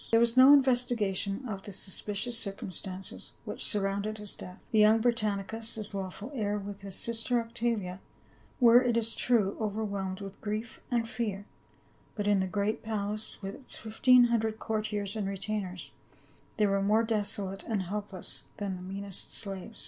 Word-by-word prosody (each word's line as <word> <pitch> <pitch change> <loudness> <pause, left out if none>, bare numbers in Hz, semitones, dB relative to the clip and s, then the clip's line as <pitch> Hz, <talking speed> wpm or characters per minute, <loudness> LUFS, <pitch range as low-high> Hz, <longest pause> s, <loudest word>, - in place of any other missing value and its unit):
There 225 - +5
was 235 0 +4
no 260 +2 +9
investigation 245 -5 +2
of 195 -4 -4
the 205 - -8
suspicious 205 +4 0
circumstances 195 -3 -5
which - - -3
surrounded 200 +1 0
his 210 -1 -9
death. 180 +1 -11
The 220 - +3
young 215 +1 +6
Brittanicus, 220 -1 0
his 215 -1 -2
lawful 195 +5 -5
heir, 210 -5 -1
with 200 0 -7
his 195 -1 -2
sister 235 +2 +2
Oc 230 0 -7
tavia, 215 -6 -1 0.6
were, 240 -1 +8
it 240 -2 +1
is 230 0 +1
true, 215 -6 +2
overwhelmed 200 -3 -2
with 195 -1 -9
grief 215 +2 -4
and 235 -2 +1
fear, 220 -4 -3 0.7
but 205 -3 -2
in 205 -1 +4
the 190 - 0
great 205 +4 -1
palace 210 -1 -1
with 195 +1 -4
its 265 - -6
fifteen 245 +3 +5
hundred 225 -2 +1
courtiers 210 -2 -2
and 210 -3 -2
retainers 195 -2 -4 0.7
they 215 - +4
were 195 -1 +2
more 210 +3 +3
desolate 205 -3 -1
and 210 -4 0
helpless 200 0 -5
than 195 -2 -3
the - - -10
meanest 195 +1 -4
slaves. 195 +1 -4
210 Hz, 165 wpm, -30 LUFS, 195-230 Hz, 0.7 s, no